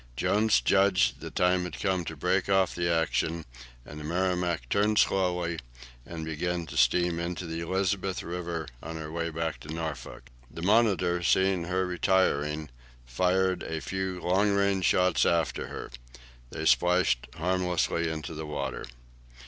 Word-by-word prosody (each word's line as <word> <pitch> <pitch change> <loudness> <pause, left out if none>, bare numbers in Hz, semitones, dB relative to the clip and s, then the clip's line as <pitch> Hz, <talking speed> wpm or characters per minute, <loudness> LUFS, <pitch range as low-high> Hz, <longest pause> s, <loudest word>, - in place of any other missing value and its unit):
Jones 105 - +2
judged 100 0 +3
the - - -7
time 90 0 +2
had 90 - -6
come 95 -3 0
to - - -5
break - - 0
off 95 -2 +3
the 85 0 -1
action, 80 0 0 0.4
and 75 - -9
the - - -8
"Merrimac" 90 -3 -1
turned 105 +7 +2
slowly, 90 -3 +1 0.5
and 80 -2 -6
began 85 +2 -2
to - - -10
steam 85 -1 +3
into 85 0 -4
the 80 0 -4
Elizabeth 95 +2 -1
River, 85 -2 -4 0.2
on 80 +2 -7
her 80 -1 -6
way 85 0 -2
back 80 0 -3
to 75 - -9
Norfolk. 80 -5 -6 0.2
The 85 - -8
"Monitor," 95 -4 +3
seeing 95 0 +2
her 95 +1 0
retiring, 80 -6 +1 0.3
fired 90 +8 +1
a 80 0 -4
few 95 +1 -3
long 95 +4 +2
range 100 -2 +2
shots 90 -1 +3
after 85 -2 +1
her. - - -7 0.6
They - - -5
splashed 90 0 +3
harmlessly 90 -1 0
into 80 0 -5
the 80 0 -6
water. 70 -4 -4
90 Hz, 150 wpm, -28 LUFS, 80-95 Hz, 0.6 s, judged